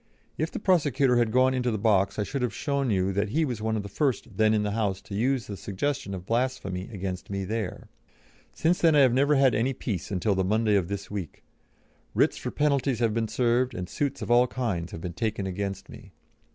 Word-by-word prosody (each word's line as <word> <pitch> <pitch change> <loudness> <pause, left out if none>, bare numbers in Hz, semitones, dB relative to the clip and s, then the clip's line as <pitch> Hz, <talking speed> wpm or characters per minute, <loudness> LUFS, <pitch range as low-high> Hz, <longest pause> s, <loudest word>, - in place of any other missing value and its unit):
If 155 +2 -1
the - - -6
prosecutor 145 - +2
had 120 -2 +2
gone 130 +2 +4
into 125 -1 0
the 110 - -1
box 100 -2 +2
I 105 - +1
should 135 +5 -4
have 120 -5 -1
shown 140 -2 -1
you 95 -2 +1
that 100 +2 0
he 160 +8 +1
was 120 -6 -4
one 110 0 0
of 105 - -3
the - - -6
first 120 -1 -1
then 110 +1 +3
in 105 -1 +2
the 105 - -1
House 100 -3 -1
to - - -10
use 125 +3 0
the 100 - -6
suggestion 100 +2 -3
of 90 -1 -8
blasphemy 115 -5 -2
against 95 -3 -5
me 100 -1 -3
there. 110 -1 -4 0.6
Since 170 +3 +1
then 165 -2 +5
I 145 - +6
have 130 -3 +5
never 140 +3 +3
had 135 -2 +4
any 120 +5 +1
peace 100 -9 -4
until 100 +2 0
the 95 0 +1
Monday 110 +3 +2
of 95 -4 +1
this 100 0 -5
week. 95 -6 -6 0.7
Writs - - +3
for - - -4
penalties 140 -3 +1
have 115 -2 +1
been 115 0 0
served, 125 +1 +1
and 90 -4 -4
suits 140 +5 -2
of - - -3
all 120 +1 +5
kinds 100 -10 -3
have 80 - -7
been 85 0 -5
taken 110 -1 -2
against 100 +1 -4
me. - - -13
110 Hz, 230 wpm, -27 LUFS, 100-130 Hz, 0.7 s, I